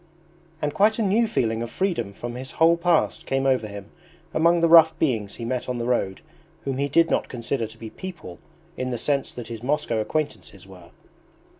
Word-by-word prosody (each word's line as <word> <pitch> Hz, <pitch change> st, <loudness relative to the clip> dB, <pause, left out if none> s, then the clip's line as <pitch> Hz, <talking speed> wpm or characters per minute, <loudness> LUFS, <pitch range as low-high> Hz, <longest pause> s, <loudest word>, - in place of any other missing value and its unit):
And 145 Hz, -1 st, 0 dB
quite 215 Hz, +2 st, +3 dB
a 225 Hz, -, +1 dB
new 215 Hz, +4 st, +3 dB
feeling 115 Hz, -, 0 dB
of 120 Hz, -, -4 dB
freedom 170 Hz, -, -1 dB
from 120 Hz, +4 st, -7 dB
his 130 Hz, +2 st, -6 dB
whole 165 Hz, +1 st, +5 dB
past 170 Hz, -1 st, +1 dB
came 135 Hz, 0 st, 0 dB
over 130 Hz, -5 st, +2 dB
him 100 Hz, -1 st, -9 dB, 0.4 s
among 170 Hz, +2 st, +4 dB
the 170 Hz, -, +5 dB
rough 160 Hz, -1 st, +7 dB
beings 110 Hz, -9 st, -1 dB
he 115 Hz, -, -6 dB
met 125 Hz, +1 st, -3 dB
on 125 Hz, -, -2 dB
the 120 Hz, -, -3 dB
road 100 Hz, -6 st, -1 dB, 0.4 s
whom 135 Hz, -1 st, -2 dB
he 140 Hz, -, +1 dB
did 165 Hz, +4 st, +3 dB
not -, -, +1 dB
consider 115 Hz, -1 st, -2 dB
to 110 Hz, +1 st, -14 dB
be 110 Hz, -1 st, -9 dB
PEOPLE 170 Hz, -, -9 dB, 0.4 s
in 130 Hz, -, -2 dB
the 120 Hz, -, -2 dB
sense 140 Hz, +3 st, -1 dB
that 120 Hz, -2 st, -8 dB
his 115 Hz, -2 st, -6 dB
Moscow 135 Hz, -3 st, 0 dB
acquaintances 110 Hz, -, -3 dB
were. 90 Hz, -3 st, -14 dB
130 Hz, 200 wpm, -24 LUFS, 115-160 Hz, 0.4 s, rough